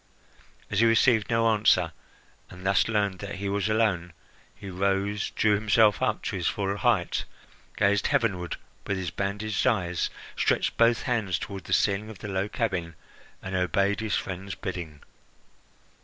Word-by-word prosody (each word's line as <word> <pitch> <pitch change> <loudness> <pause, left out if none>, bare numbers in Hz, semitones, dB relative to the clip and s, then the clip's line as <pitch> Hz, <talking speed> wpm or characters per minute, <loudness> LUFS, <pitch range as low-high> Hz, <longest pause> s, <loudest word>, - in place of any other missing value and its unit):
As 100 - +1
he 115 - +5
received 115 -2 +4
no 115 0 +3
answer, 105 -6 +3 0.6
and 90 +1 -12
thus 95 0 +3
learned 100 -4 0
that 100 0 -6
he 100 +1 -4
was 100 +1 0
alone, 100 -6 +1 0.4
he 100 -1 -10
rose, 100 +2 0
drew 110 -1 +2
himself 105 0 +3
up - - 0
to - - -3
his - - -1
full 100 -1 -1
height, 110 -7 +1 0.5
gazed 100 -1 +2
heavenward 90 -7 0 0.3
with 100 - -1
his 90 -3 -3
bandaged 105 +3 -1
eyes, 90 -8 +1 0.3
stretched - - +1
both 115 0 +3
hands 110 -8 0
toward 95 -2 -7
the - - -9
ceiling 100 +1 +1
of 110 - -9
the 105 - -7
low 95 +1 -1
cabin, 95 -9 -2 0.5
and 95 - -5
obeyed 100 +2 +1
his 110 -2 -1
friend's 95 +1 -4
bidding. 80 -5 -6
100 Hz, 155 wpm, -27 LUFS, 95-110 Hz, 0.6 s, he